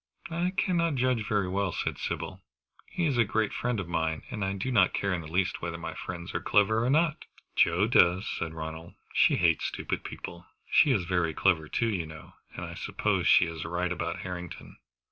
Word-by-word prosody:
"I 175 +2 0
cannot 170 -4 +2
judge 125 -4 +1
very 105 -3 +1
well," 95 0 0
said - - -3
Sybil. - - -4 0.5
"He 175 - -2
is 135 -6 +1
a - - +7
great 110 0 0
friend 120 -2 -1
of 95 - -4
mine, 80 -2 -1
and 105 -4 -3
I 95 0 0
do 100 +7 -3
not 100 -7 +4
care 100 -2 0
in 90 - -2
the 80 - -9
least 95 +2 0
whether 85 -1 -3
my 80 -1 -5
friends 85 0 -6
are - - -2
clever 110 +2 +3
or 125 - +1
not." 155 +2 +2 0.3
"Joe 85 +4 +4
does," 95 -4 +4
said 80 -1 -3
Ronald. 80 +1 -7 0.2
"She - - +5
hates 85 -2 +2
stupid - - -3
people. 85 0 -8 0.2
She - - +6
is 110 -9 +2
very 85 -3 0
clever 80 -5 +2
too, 115 - +1
you 90 -7 -2
know, 80 0 -12 0.2
and - - -5
so - - -7
I - - -7
suppose - - -1
she - - +6
is 80 -1 -5
right 85 +2 -2
about 85 -1 -3
Harrington." 90 -2 -7
90 Hz, 210 wpm, -29 LUFS, 85-115 Hz, 0.5 s, a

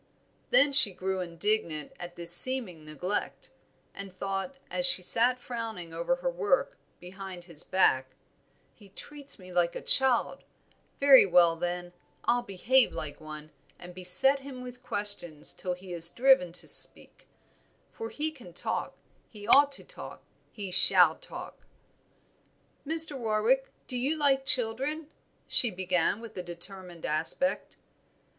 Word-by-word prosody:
Then 290 - +3
she 255 -9 +8
grew 190 +1 -5
indignant 170 -3 -3
at 175 0 -10
this 170 0 +8
seeming 220 -8 +3
neglect, 180 - -5 0.4
and 195 -1 -10
thought, 195 +8 -6
as 270 0 +4
she 190 -9 +6
sat 240 +6 +1
frowning 225 -9 -8
over 170 +10 -2
her - - -4
work, - - -2 0.2
behind 185 0 -11
his 170 -4 -8
back 130 -8 0 0.6
"He 205 -3 -20
treats 285 +7 -12
me 185 -2 -14
like 175 -1 -1
a - - -5
child, 265 -3 +2 0.6
very 275 -6 +6
well, 175 -2 +3
then, 175 +1 -6 0.3
I'll 245 +1 0
behave 240 +4 0
like 145 -2 -8
one, 155 0 -11 0.3
and 180 0 -13
beset 185 +10 +2
him 270 -2 -11
with 250 0 -12
questions 200 -7 -4
till 180 - -6
he 180 0 -12
is 170 -1 +3
driven 245 -6 +2
to 180 - -5
speak; - - -2 0.6
for 455 -1 -9
he 310 +1 -5
can 240 - -16
talk, - - -5 0.3
he 210 -2 -13
ought 285 +4 +4
to - - -1
talk, - - -13 0.3
he 200 -4 -9
shall - - +6
talk." - - -12 1.2
"Mr. 320 -1 +4
Warwick, 235 +2 -1 0.2
do 255 - -1
you 270 +6 -2
like 270 -2 0
children?" 270 +6 +1 0.3
she 240 - +3
began, 185 0 -2
with 230 -2 -12
a - - -4
determined 175 0 -9
aspect. 160 - -1
200 Hz, 140 wpm, -27 LUFS, 175-265 Hz, 1.2 s, she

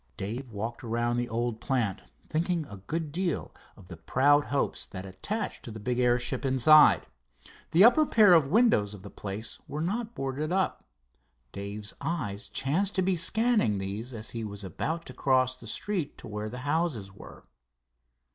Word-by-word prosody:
Dave 120 +7 -5
walked 115 +2 -5
around 120 +1 -1
the 120 0 -2
old 115 0 -2
plant, 115 -8 -1 0.3
thinking 165 0 -1
a 100 - -10
good 150 - -4
deal 175 0 -2 0.2
of 95 - -15
the 85 - -9
proud 145 - +3
hopes 140 - -1
that 95 -1 -8
attached 200 - -4
to - - -9
the 110 0 -8
big 125 +4 -2
airship 125 +1 +1
inside. 135 +3 +6 0.6
The 170 +4 +5
upper 265 +7 +6
pair 210 -5 +6
of 160 -5 +5
windows 145 - +3
of 95 - -13
the 100 - -10
place 105 +2 -4
were 150 - -5
not 215 +8 -2
boarded 135 +4 -3
up. 190 0 0 0.7
Dave's 100 +1 -5
eyes 130 -9 -3
chanced 185 +9 0
to 185 - +2
be 190 0 +2
scanning 215 - +2
these 100 +6 -4
as 110 -2 -4
he 115 -1 -4
was 100 -1 -5
about 160 - -3
to 130 - -9
cross 130 0 +2
the 120 -2 -12
street 175 - -2
to - - -10
where 105 0 -4
the 125 - -7
houses 145 - -1
were. 100 - -13
130 Hz, 175 wpm, -28 LUFS, 105-165 Hz, 0.7 s, inside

